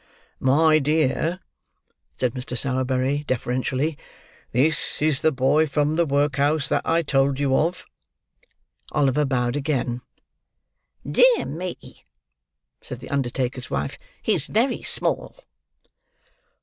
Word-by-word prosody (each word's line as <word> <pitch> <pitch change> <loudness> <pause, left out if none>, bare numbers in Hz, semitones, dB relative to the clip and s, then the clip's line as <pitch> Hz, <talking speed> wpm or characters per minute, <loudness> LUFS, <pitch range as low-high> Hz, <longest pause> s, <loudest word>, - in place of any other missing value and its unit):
"My 155 +4 +4
dear," 155 +4 0 0.8
said 125 -2 0
Mr. 125 -1 -4
Sowerberry, 130 +2 0
deferentially, 130 +4 -1 0.5
"this 150 +6 +1
is 150 -2 +1
the 160 - +3
boy 140 +4 +2
from 150 +1 0
the 170 0 +2
workhouse 145 +1 +1
that - - +1
I 165 +1 +2
told 135 -2 +1
you 135 -2 +2
of." 170 +5 0 1.1
Oliver 145 0 +2
bowed 125 -2 0
again. 135 -4 -1 1.1
"Dear - - +4
me!" 175 +4 -7 0.8
said 125 - -8
the 130 - -10
undertaker's 130 -2 -2
wife, 70 +1 -3 0.2
"he's - - 0
very 240 +4 +1
small." - - -1
140 Hz, 110 wpm, -23 LUFS, 130-155 Hz, 1.1 s, My